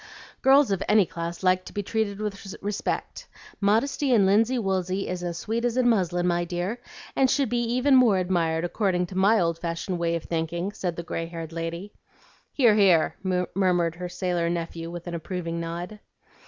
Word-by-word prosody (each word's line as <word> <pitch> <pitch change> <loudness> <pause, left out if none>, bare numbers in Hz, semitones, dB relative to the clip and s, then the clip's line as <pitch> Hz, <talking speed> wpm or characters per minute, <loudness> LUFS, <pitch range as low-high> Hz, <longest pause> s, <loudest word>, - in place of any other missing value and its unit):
"Girls 270 -2 +5
of 195 - 0
any 210 -2 +5
class 170 +1 -6
like 185 0 +3
to - - -10
be 205 - -2
treated 210 -1 -1
with 210 -2 -4 0.2
respect. 205 0 -3 0.3
Modesty 230 +7 +1
in 215 -5 +5
linsey 225 +6 +3
woolsey 190 -2 -1
is 180 -1 -4
as 170 -1 -3
sweet 225 +5 -2
as 245 0 0
in 255 -1 +3
muslin, 180 -6 +1
my 175 -1 +1
dear, 180 +7 -3 0.3
and 265 -1 +3
should 275 0 +1
be 240 - 0
even 250 +4 +2
more 240 -6 +5
admired, 170 -3 0
according 180 -1 0
to 185 - -10
my 200 +4 +4
old 165 -1 0
fashioned 170 +2 -3
way 170 0 0
of 165 - -4
thinking," 170 +3 -2
said 180 -4 -3
the 170 - -5
gray 165 0 -4
haired 165 -1 -7
lady. 170 +4 -5 0.6
"Hear! 240 -6 +4
hear!" 190 -6 +4 0.4
murmured 175 -3 +2
her 180 +1 -6
sailor 175 -2 -1
nephew 165 -1 -4
with 175 0 -7
an 175 - -5
approving 170 0 -4
nod. 175 +5 -5
185 Hz, 185 wpm, -25 LUFS, 170-215 Hz, 0.6 s, Girls